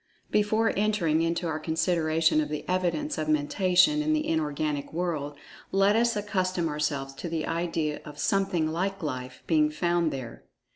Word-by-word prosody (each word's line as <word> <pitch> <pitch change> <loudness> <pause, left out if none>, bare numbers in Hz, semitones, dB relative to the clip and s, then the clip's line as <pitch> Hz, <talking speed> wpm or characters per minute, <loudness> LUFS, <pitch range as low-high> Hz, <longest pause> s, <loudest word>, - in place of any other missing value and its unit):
Before 215 +2 +2
entering 195 -7 +1
into 170 +1 0
our 155 -1 -2
consideration 160 -1 +2
of 150 - -3
the 150 -1 -5
evidence 175 -4 -1
of 155 0 -2
Mentation 185 - +3
in 310 +1 +1
the 305 0 0
Inorganic 150 -2 -1
world, 155 -4 -3 0.3
let 195 +2 +4
us 235 0 +2
accustom 185 -4 -1
ourselves 145 -2 -2
to 165 +5 -6
the 160 -1 -2
idea 165 -3 -2
of 150 -1 -10
"something 180 -1 +1
like 190 +4 -2
Life" 130 -3 -5
being 155 -2 +3
found 170 +1 +1
there. 125 -4 -7
165 Hz, 155 wpm, -27 LUFS, 150-185 Hz, 0.3 s, let